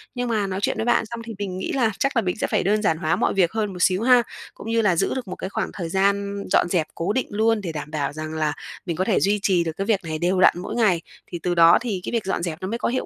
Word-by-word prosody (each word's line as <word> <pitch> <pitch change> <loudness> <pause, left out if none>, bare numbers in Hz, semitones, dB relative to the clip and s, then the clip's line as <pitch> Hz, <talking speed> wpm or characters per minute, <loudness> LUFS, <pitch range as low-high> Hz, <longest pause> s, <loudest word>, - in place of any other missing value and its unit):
Nhưng 245 -1 -2
mà 210 -3 0
nói 190 0 -3
chuyện - - 0
với 220 - -1
bạn 240 - +2
xong 235 +1 -7
thì 230 - -6
mình 190 -2 -4
nghĩ - - -3
là 235 -5 +2
chắc 275 0 0
là 230 - +3
mình 180 -3 -1
sẽ - - -1
phải - - 0
đơn 210 +3 +2
giản 160 -6 +1
hóa 160 -1 0
mọi - - +1
việc 180 -3 +2
hơn 215 -3 -2
một 180 - -8
xíu 185 +1 +3
ha, 245 -1 +6 0.3
cũng 225 - -9
như 230 0 +2
là 190 -5 +3
giữ - - +1
được 255 -4 -4
một 185 - -5
cái 190 - -5
khoảng - - -2
thời 170 -4 -5
gian 200 +2 0
dọn - - +4
dẹp 170 -4 +1
cố 175 +5 -1
định 260 - -1
luôn 220 +1 +1
để 170 -4 -4
đảm 150 -1 -6
bảo 145 -2 -2
rằng 155 +1 -6
là 155 -1 0 0.3
mình 170 -3 -2
có 185 - 0
thể 195 0 +2
duy 205 +1 +2
trì 180 -3 +3
được 165 - -2
cái 195 - -2
việc 210 -3 +2
này 160 -1 -3
đều 180 +2 +1
đặn - - +7
mỗi 190 - -5
ngày. 205 -8 +2 0.3
Thì 175 - -6
từ 175 -1 0
đó 170 0 +7
thì 210 -7 -3
cái - - -4
việc 230 -4 -1
dọn 190 -2 -2
dẹp 170 -1 -4
nó 185 - -3
mới 230 - -2
có - - -1
hiệu 255 +2 -1
195 Hz, 320 wpm, -23 LUFS, 170-220 Hz, 0.3 s, đặn